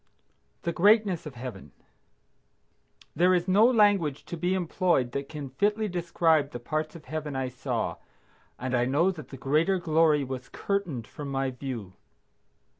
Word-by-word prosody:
THE 170 - -1
GREATNESS 200 -3 +3
OF 140 - -9
HEAVEN. 120 - -8 1.4
There 180 +2 +4
is 175 +1 0
no 200 +4 +5
language 205 - +3
to - - -5
be 175 +3 0
employed 170 -7 +1
that 140 +2 -4
can 145 -4 -7
fitly 210 +9 +1
describe 165 -4 +1
the 120 - -7
parts 155 +6 -3
of 160 - -11
Heaven 150 -2 -4
I 130 -1 -1
saw, 125 0 -3 0.6
and 130 +1 -4
I 120 -1 +2
know 150 +9 +2
that 155 -8 -9
the 135 - -10
greater 155 +9 +2
glory 160 -3 +3
was 130 -1 -6
curtained 180 - -2
from 145 +2 -8
my 135 -1 -1
view. 125 -7 -6
155 Hz, 155 wpm, -27 LUFS, 135-180 Hz, 1.4 s, no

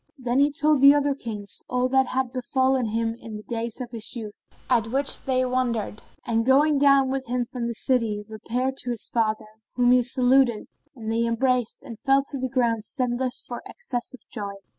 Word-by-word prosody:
Then 250 0 0
he 285 +1 +4
told 300 0 +2
the 280 +1 +8
other 290 -1 +2
Kings 215 -7 -3
all 250 0 +1
that 265 0 +3
had 255 -1 -2
befallen 260 -1 +1
him 225 +1 -1
in 220 -2 -8
the 210 - -10
days 230 0 -4
of 245 -2 -6
his 225 0 -2
youth, 215 -3 -8 0.2
at 235 -3 +2
which 275 +4 0
they 255 -1 +1
wondered 240 -4 -2 0.2
and, 230 -1 +1
going 280 +4 +4
down 275 -2 +4
with 270 -1 -3
him 245 0 -1
from 235 0 -4
the 235 - -4
city, 220 -5 0
repaired 245 +4 -3
to 245 - 0
his 235 -3 -2
father, 220 -1 0 0.3
whom 245 -1 +4
he 250 0 +6
saluted, 250 -1 +3 0.3
and 225 -3 -5
they 230 +1 +1
embraced 245 0 0
and 230 -2 -9
fell 275 -1 +3
to 275 - -4
the 260 0 -2
ground 235 -4 0
senseless 250 +1 -1
for 240 - -6
excess 260 - -4
of - - -20
joy. 200 -3 -5
250 Hz, 200 wpm, -24 LUFS, 230-265 Hz, 0.3 s, the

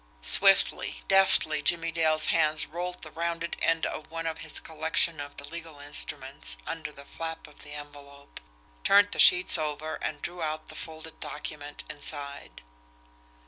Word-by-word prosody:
Swiftly, - - +4
deftly, 185 -5 +4
Jimmie 165 +2 +1
Dale's 155 -1 +2
hands 155 -1 +2
rolled 175 +2 -6
the 155 - -9
rounded 170 +1 -3
end 165 0 +1
of 155 - -5
one 165 0 -5
of 160 -1 -3
his 160 - -1
collection 160 0 +1
of 145 0 -8
the 145 - -6
legal 165 -2 -8
instruments 145 -1 +1
under 160 -2 -5
the 140 -1 -13
flap 165 +1 -6
of 150 - -17
the 145 - -10
envelope, 145 -1 -11 0.4
turned 205 0 +5
the - - -4
sheets 180 -1 +7
over 155 +1 -3
and - - -4
drew 175 0 -5
out 155 0 -3
the 155 - -8
folded 160 0 -8
document 145 -1 -6
inside. 140 - -7
155 Hz, 155 wpm, -28 LUFS, 145-165 Hz, 0.4 s, sheets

